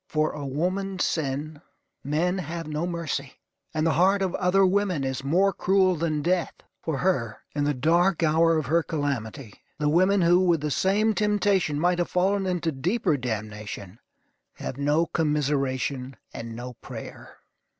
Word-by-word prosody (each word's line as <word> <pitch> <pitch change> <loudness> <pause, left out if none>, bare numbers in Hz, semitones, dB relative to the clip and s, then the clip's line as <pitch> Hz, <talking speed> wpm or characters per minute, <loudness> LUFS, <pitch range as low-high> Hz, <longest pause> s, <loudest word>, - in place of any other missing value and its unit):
For 155 -1 0
a 145 -2 -6
woman's 185 +6 -1
sin, 150 0 -3 0.4
men 170 +6 0
have 165 0 -5
no 155 +3 -2
mercy; 160 -6 -3 0.4
and 155 0 -1
the 165 - +3
heart 195 +1 +4
of 185 -2 -1
other 190 +1 +3
women 185 -5 +1
is 130 0 -3
more 185 +8 +2
cruel 185 0 +3
than 155 -2 -1
death. 175 0 0 0.3
For 160 -4 -2
her, 120 -13 0 0.2
in 145 -1 0
the 145 -1 +1
dark 170 +6 +2
hour 165 +1 +4
of 155 - -1
her 165 +5 +2
calamity, 140 -7 -3 0.2
the 150 0 +1
women 185 +4 +3
who, 175 +1 +5
with 175 -4 +2
the 150 0 -2
same 210 +7 +2
temptation, 205 -7 +1
might 175 +2 +2
have 175 - 0
fallen 190 +2 +1
into 175 -3 0
deeper 165 - 0
damnation, 110 -4 -5 0.5
have - - -6
no 145 +4 +2
commiseration 140 -4 -1 0.2
and 115 0 -7
no 125 +1 -7
prayer. - - -9
160 Hz, 160 wpm, -26 LUFS, 140-180 Hz, 0.5 s, who